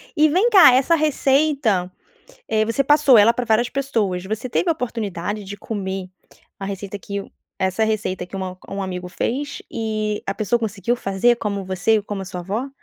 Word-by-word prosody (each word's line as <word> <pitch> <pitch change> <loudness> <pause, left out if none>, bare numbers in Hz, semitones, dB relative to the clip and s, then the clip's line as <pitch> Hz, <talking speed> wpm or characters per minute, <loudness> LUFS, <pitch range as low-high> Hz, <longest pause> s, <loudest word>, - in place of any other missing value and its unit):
E 310 -1 +5
vem 375 +10 +3
cá, 380 - +8
essa 270 +6 +4
receita, 275 - +1 0.6
eh, 215 -1 +2
você 230 +5 0
passou 290 -2 +5
ela 210 +3 +6
pra 245 +1 -3
várias 230 +1 +2
pessoas, 220 -10 -1
você 215 +5 -4
teve 345 - 0
a - - +5
oportunidade 210 - -4
de 200 +1 -7
comer 190 -3 -4 0.5
a 195 - -6
receita 200 0 -5
que 200 0 -5
o - - -11 0.3
essa 190 +3 0
receita 210 -4 -1
que 180 - -9
uma 185 -1 -5
um 195 - -4
amigo 180 -2 -4
fez, 275 +10 -3
e 215 -2 -2
a 195 - -2
pessoa 215 +3 0
conseguiu 215 0 -1
fazer 235 +1 +1
como 200 -3 -3
você, 190 +4 +1
e 210 - -1
como 200 -1 -5
a - - -6
sua 180 -1 -7
avó? 205 +9 -3
215 Hz, 190 wpm, -21 LUFS, 195-250 Hz, 0.6 s, cá